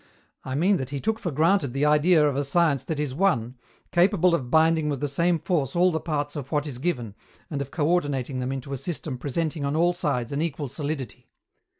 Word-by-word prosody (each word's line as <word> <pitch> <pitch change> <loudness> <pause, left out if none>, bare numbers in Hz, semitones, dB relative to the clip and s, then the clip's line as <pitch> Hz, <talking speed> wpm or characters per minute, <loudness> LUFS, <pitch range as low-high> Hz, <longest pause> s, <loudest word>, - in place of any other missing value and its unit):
I 130 - -4
mean 185 +7 +3
that 130 -2 -4
he 140 -1 -4
took 220 +7 -1
for 175 - -3
granted 155 -2 +2
the 140 +2 +1
idea 150 +1 +4
of 140 - -1
a 140 - 0
science 140 -2 +2
that 160 -3 -3
is 145 -3 -2
one, 130 -8 +1 0.4
capable 180 0 +3
of 130 -7 -1
binding 160 +1 +3
with 140 -3 -2
the 145 - -1
same 170 +5 +1
force 160 -5 -1
all 180 +1 +4
the 160 - -1
parts 145 -3 -3
of 140 -3 -6
what 150 -1 0
is 135 -5 -6
given, 125 - -2 0.4
and 140 -2 -2
of 140 - -5
coördinating 145 -5 0
them 125 +1 -2
into 135 +1 -5
a - - -2
system 150 -3 -5
presenting 155 +3 -2
on 140 +1 -1
all 175 +2 +3
sides 140 -9 -2
an 140 +1 -1
equal 150 -4 -3
solidity. 140 -3 -5
150 Hz, 220 wpm, -25 LUFS, 135-170 Hz, 0.4 s, idea